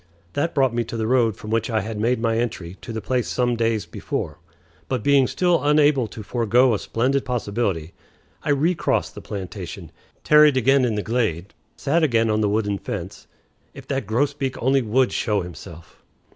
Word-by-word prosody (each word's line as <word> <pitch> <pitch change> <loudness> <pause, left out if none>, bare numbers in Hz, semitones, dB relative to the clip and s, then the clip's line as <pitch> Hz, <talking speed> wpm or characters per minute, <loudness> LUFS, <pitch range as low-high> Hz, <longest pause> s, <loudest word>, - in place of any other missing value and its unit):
That 155 +4 -1
brought 135 -4 +3
me 120 0 0
to 115 +1 -6
the 110 - -1
road 115 -3 +2
from 105 - -8
which 115 +1 0
I 110 -2 +1
had 110 +1 -5
made 120 +3 +1
my 115 -1 0
entry 95 -7 -3
to 120 - -7
the 110 -1 -4
place 125 0 0
some 125 -1 0
days 115 -4 0
before; 80 -1 -5 0.5
but, 130 - -1
being 140 -2 +4
still 175 -3 +1
unable 145 -4 +3
to 110 0 -9
forego 120 +3 +2
a 105 - 0
splendid 130 +4 0
possibility, 100 - -2 0.5
I - - -5
recrossed 155 +5 +1
the - - -9
plantation, 95 -3 -7 0.3
tarried 150 -2 +6
again 130 +1 +4
in 115 -3 0
the 105 - -2
glade, 105 -6 -1 0.2
sat 155 +4 +1
again 115 -7 +2
on 110 0 +1
the 105 - +2
wooden 105 -1 0
fence - - -6 0.5
(if - - -11
that 135 -6 -2
grosbeak 135 +3 -1
only 135 +2 +2
would 125 +3 +2
show 105 -3 0
himself!) 85 -1 -11
115 Hz, 185 wpm, -22 LUFS, 105-135 Hz, 0.5 s, tarried